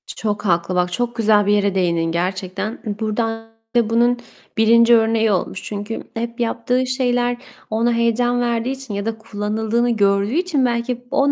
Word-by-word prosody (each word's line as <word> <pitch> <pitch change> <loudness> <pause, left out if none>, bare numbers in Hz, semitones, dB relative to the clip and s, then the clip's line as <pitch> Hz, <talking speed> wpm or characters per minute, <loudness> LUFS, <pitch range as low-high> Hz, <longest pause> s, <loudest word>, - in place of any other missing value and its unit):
Çok 210 -1 -4
haklı. 175 0 +1
Bak, 180 0 +1
çok 240 +5 -2
güzel 215 -3 +3
bir 205 - +3
yere 200 -1 +1
değindin 170 -3 +1
gerçekten. 185 +5 -3 0.2
Burada 220 +1 -1 0.5
da 235 -2 +3
bunun 240 +2 +3 0.4
1. 230 +2 +6
örneği 225 -1 +2
olmuş. 190 0 -2
Çünkü 205 +2 -5
hep 235 +1 -5
yaptığı 245 +2 0
şeyler 245 -1 0 0.3
ona 230 +2 +1
heyecan 235 +1 +1
verdiği 235 +1 0
için 270 -4 -6
ya 200 0 -3
da 225 0 -2
kullanıldığını 220 +2 -1
gördüğü 200 -1 +2
için 325 -5 +1
belki 245 +1 -2
o 280 0 +3
225 Hz, 160 wpm, -20 LUFS, 205-240 Hz, 0.5 s, 1